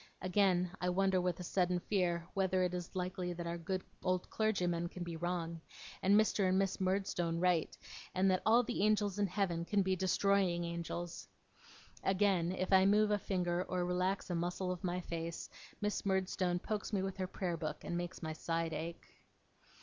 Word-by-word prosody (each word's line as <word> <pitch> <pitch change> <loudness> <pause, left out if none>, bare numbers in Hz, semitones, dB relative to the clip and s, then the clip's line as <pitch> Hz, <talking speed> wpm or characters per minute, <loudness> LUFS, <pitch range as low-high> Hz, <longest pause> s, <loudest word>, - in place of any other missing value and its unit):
Again, 185 -1 +2
I 180 - +1
wonder 190 0 +2
with 180 -1 -1
a - - -4
sudden 180 0 +1
fear 175 -2 0
whether 190 -1 +2
it 180 0 0
is 180 +1 -5
likely 180 -1 -2
that 170 0 -5
our 170 0 -3
good 185 +2 -2 0.2
old 185 0 0
clergyman 180 -6 0
can 180 0 -6
be 170 -1 -5
wrong, 170 -1 -3 0.4
and 200 +2 +5
Mr. 205 -3 +2
and 185 - +3
Miss 195 0 0
Murdstone 185 -3 0
right, 180 -2 +1 0.4
and 190 +1 +4
that 185 - +1
all 230 +3 +5
the 240 -2 -2
angels 210 -1 +2
in 205 - +3
Heaven 180 -3 0
can 200 +3 +2
be 190 0 +1
destroying 190 -1 +2
angels. 170 0 -4 0.8
Again, 190 -3 +2
if 185 +1 -1
I 190 0 +7
move 210 +2 +4
a 205 - +2
finger 180 -2 0
or 180 -1 0
relax 180 +2 0
a - - 0
muscle 180 +2 -1
of 180 -1 -5
my 180 0 -1
face, 170 -1 -5 0.3
Miss 210 0 -1
Murdstone 190 -2 +1
pokes 210 +4 -3
me 195 -3 0
with 195 0 -3
her 185 -1 -2
prayer 180 -2 -2
book, 155 -2 -4
and 175 - -3
makes 175 +1 -4
my 160 0 -2
side 165 +1 -2
ache. 165 +2 -5
180 Hz, 190 wpm, -35 LUFS, 175-195 Hz, 0.8 s, I